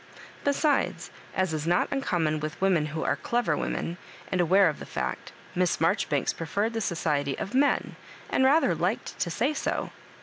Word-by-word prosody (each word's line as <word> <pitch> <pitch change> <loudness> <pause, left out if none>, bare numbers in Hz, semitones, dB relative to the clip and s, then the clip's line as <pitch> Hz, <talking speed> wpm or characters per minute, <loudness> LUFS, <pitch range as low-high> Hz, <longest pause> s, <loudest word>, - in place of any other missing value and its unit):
Besides, 285 +1 +1 0.2
as 185 -3 +1
is 155 0 -2
not 175 +1 +3
uncommon 170 - 0
with 150 0 -5
women 180 -6 +2
who 155 +1 -3
are - - +1
clever 240 -1 0
women, 170 +1 -3 0.3
and 185 - +2
aware 185 +3 +5
of 155 - -2
the - - -7
fad^ - - -2 0.4
Miss 180 -1 +1
Marjoribanks 150 -3 +1
preferred 200 +7 -2
the 225 - -2
society 150 -7 0
of 200 - -5
men, 280 +2 +2 0.3
and - - +2
rather 270 - +4
liked 175 +7 -2
to - - 0
say 245 - 0
so. - - -2
180 Hz, 170 wpm, -27 LUFS, 160-230 Hz, 0.4 s, aware